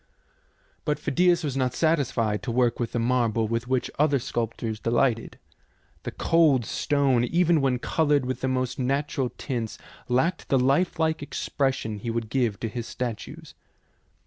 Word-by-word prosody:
But 150 -1 0
Phidias 175 +4 +2
was 140 -4 -2
not 130 -2 0
satisfied 125 - +1
to 110 - -3
work 120 0 +1
with 120 -2 -2
the - - 0
marble 115 -2 +1
with 115 +2 -2
which 130 -1 0
other 145 -1 +4
sculptors 115 -3 -3
delighted. 115 0 0 0.6
The - - -5
cold 155 -8 +3
stone, 140 -3 +1
even 170 +2 +3
when 130 -2 +2
coloured 145 +1 +1
with 130 0 -3
the 130 - 0
most 130 +1 -1
natural 135 0 0
tints, 120 -6 -4 0.3
lacked 130 +9 0
the 135 - +4
lifelike 160 +4 +1
expression 135 -6 -2
he 115 - -5
would 115 -1 -3
give 120 -7 0
to 115 - -1
his 120 +1 -5
statues. 120 -4 -6
130 Hz, 150 wpm, -26 LUFS, 115-145 Hz, 0.6 s, other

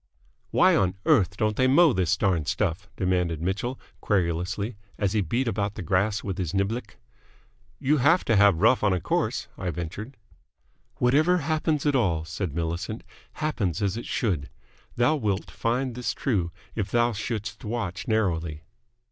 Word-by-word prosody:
"Why - - +5
on 95 -1 +2
earth 100 - +3
don't 105 0 +1
they 130 - +3
mow 155 +2 +6
this 95 -2 +1
darned 90 -6 +1
stuff?" 95 +1 -1
demanded 90 -4 0
Mitchell, 105 +9 -2 0.2
querulously, 95 +3 -1 0.2
as 100 -2 0
he 105 - +2
beat 120 +9 -1
about 100 -2 -1
the 100 - -5
grass 100 +5 +1
with 95 -2 -4
his 90 0 -2
niblick. 100 +2 -2 0.8
"You 150 +3 +2
have 160 +7 +4
to 115 - +3
have 100 -4 +5
rough 115 +1 +4
on 100 -2 +3
a 90 - +1
course," - - -1
I 95 - -2
ventured. 90 - -6 0.8
"Whatever 155 +9 +3
happens 155 -1 0
at 145 -1 +3
all," 85 -10 +1
said 80 -1 -4
Millicent, 85 +6 -3 0.3
"happens 115 - -1
as 100 -1 0
it 115 - -6
should. 100 - -1 0.5
Thou 125 +6 +3
wilt 105 -7 -2
find 125 +2 -1
this 125 +1 -3
true 95 -11 0 0.2
if 105 -3 -2
thou 120 0 +2
shouldst 105 -1 -4
watch 110 -2 -4
narrowly." 85 -8 0
105 Hz, 160 wpm, -26 LUFS, 90-120 Hz, 0.8 s, mow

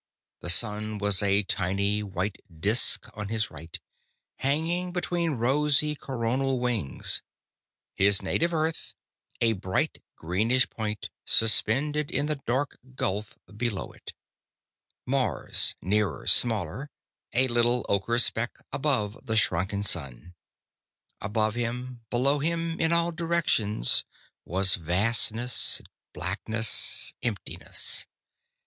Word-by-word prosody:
The 85 - -5
sun 105 +2 +3
was 105 -2 +1
a 100 0 +3
tiny 100 +3 0
white 95 0 -4
disk 100 +9 +3
on 105 -1 -6
his 110 0 -2
right, 80 +2 -9 0.6
hanging 165 +6 0
between 175 -2 -1
rosy 145 +4 +2
coronal 130 -1 -2
wings; 120 - 0 0.7
his 100 0 +4
native 170 +1 0
Earth, 160 0 -2 0.5
a 115 -1 +4
bright 95 -2 -2
greenish 110 +10 +1
point 105 -2 -5
suspended 140 +7 +2
in 140 - 0
the 150 -1 -2
dark 135 +4 -1 0.2
gulf 105 -2 -3 0.2
below 110 -3 -3
it; - - -11 0.9
Mars, 125 - +1
nearer, 100 -6 0
smaller, 120 +5 +2 0.4
a 130 +2 +3
little 120 0 +2
ocher 100 +4 +1
speck 120 -1 0 0.2
above 125 -7 0
the 110 - -1
shrunken 100 0 +1
sun. 80 -3 -2 0.9
Above 110 +1 0
him, 120 +1 -4
below 135 +4 +2
him, 165 +2 -1
in 165 0 +2
all 170 0 +4
directions 160 - +1 0.4
was 95 +2 +2
vastness, 110 +7 +3 0.3
blackness, 110 0 -1
emptiness. 115 -5 -3
115 Hz, 105 wpm, -27 LUFS, 100-135 Hz, 0.9 s, his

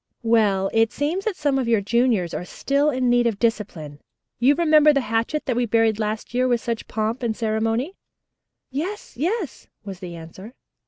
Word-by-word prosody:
"Well, 210 -4 +2
it 225 0 +3
seems 320 +7 -2
that 435 -4 -1
some 285 -5 0
of 255 - -1
your 230 -2 +3
juniors 215 -4 +1
are - - -3
still 280 +10 0
in 255 -3 0
need 240 0 +3
of 225 -4 -1
discipline. 190 -10 -2 0.4
You 265 +4 +4
remember 305 -2 +5
the 275 - +2
hatchet 230 +6 -1
that 250 - -1
we 245 0 0
buried 225 -1 +2
last 215 +2 -3
year 255 +1 +2
with 240 -2 +2
such 230 -1 -4
pomp 220 +3 -2
and 230 -3 -2
ceremony?" 225 - -1 0.8
"Yes, 345 +9 -5
yes," 345 - -3 0.2
was 195 -3 -7
the 175 -2 -7
answer. 185 +8 -11
235 Hz, 180 wpm, -23 LUFS, 215-275 Hz, 0.8 s, remember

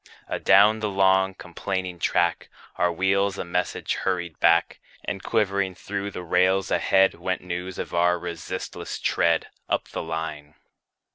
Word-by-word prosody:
Adown 105 +3 +4
the 105 -1 -1
long, 95 -1 +3
complaining 90 0 -4
track, 85 0 +1 0.3
Our 90 0 +2
wheels 95 +3 +1
a - - -4
message 90 +1 -2
hurried 85 -4 -2
back; 85 0 +3 0.3
And 95 - -3
quivering 100 -4 0
through 100 +2 -4
the 90 -2 -7
rails 95 +3 +2
ahead, 95 0 +3
Went 90 +2 -3
news 90 +1 -5
of - - -5
our 90 +1 +3
resistless 85 -2 -6
tread, 85 -1 +1 0.2
Up - - -1
the - - -4
line. 80 -2 -5
90 Hz, 140 wpm, -25 LUFS, 85-95 Hz, 0.3 s, Adown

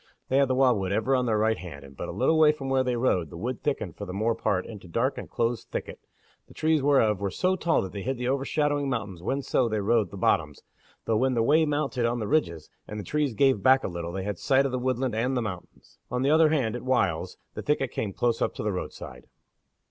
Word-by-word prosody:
They 130 - +2
had 140 0 +4
the 130 - 0
wildwood 120 -8 +2
ever 110 +6 +1
on 125 -1 +1
their 110 -2 +2
right 110 +1 +1
hand, 70 -6 -9
and 70 0 -14
but - - -6
a - - -3
little 160 - +2
way 155 -1 +7
from 135 -3 -6
where 135 -1 +2
they 125 -1 -1
rode 95 -10 +1
the 85 - -9
wood 120 +7 -4
thickened 145 -2 -2
for 100 - -5
the 90 - -6
more 110 +4 +1
part 95 -4 -1
into 105 -4 -10
dark 115 +10 0
and - - -8
close 115 0 -1
thicket, - - -6 0.5
the - - -17
trees 155 -1 +2
whereof 130 -8 +3
were 100 - 0
so 185 - 0
tall 170 - +1
that 95 - -6
they 100 - -6
hid 130 +5 -2
the 125 0 -3
overshadowing 145 +1 0
mountains 100 -8 -4
whenso 130 +2 0
they 110 -1 -1
rode 105 -1 +2
the 100 - -9
bottoms, 75 -5 0 0.4
though 110 - +1
when 130 +2 +1
the 115 - +2
way 155 +6 +4
mounted 145 -5 0
on 120 +1 -1
the 110 -3 -3
ridges, 85 - 0 0.2
and 105 - -6
the - - -5
trees 145 +3 -1
gave 135 -4 +3
back 130 +3 +5
a - - -1
little, 85 -1 -5
they 95 +1 -4
had 100 -2 -4
sight 135 -1 +3
of 135 - -1
the 130 - -1
woodland 130 -1 -1
and 125 +4 0
the - - +1
mountains. 90 -5 -9
On 125 +1 -1
the 140 - +3
other 160 0 +5
hand 130 -8 0
at 120 - -5
whiles 110 -11 0 0.2
the - - -5
thicket 140 -4 0
came 105 - -3
close 115 +3 0
up - - 0
to - - -5
the 105 - 0
roadside. 65 -8 -7
120 Hz, 255 wpm, -27 LUFS, 100-135 Hz, 0.5 s, way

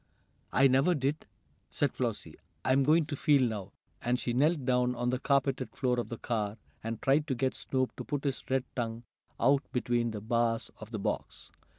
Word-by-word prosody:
"I 135 +1 +6
never 135 +7 +3
did!" 140 +2 -1 0.4
said - - 0
Flossie. - - -3 0.3
"I'm 130 +1 +4
going 155 +4 +4
to 145 -1 -4
feel 145 -2 +4
now," 105 -4 -5 0.3
and 120 +1 +1
she 120 - -1
knelt 145 +2 +2
down 125 -1 +2
on 120 +1 0
the 130 - -1
carpeted 135 -2 0
floor 125 -2 +1
of 120 - -3
the 115 - -5
car, 110 -3 -2 0.3
and 115 0 -3
tried 145 +3 +2
to 135 - 0
get 130 +2 0
Snoop 130 -1 -2
to - - -4
put 145 -1 -3
his 140 -3 -2
red 135 -1 +2
tongue 115 -1 -3 0.4
out 140 0 +4
between 120 -1 +1
the 110 -2 -4
bars 115 +1 0
of 110 - -9
the 110 - -4
box. 100 - -4
130 Hz, 195 wpm, -31 LUFS, 120-140 Hz, 0.4 s, I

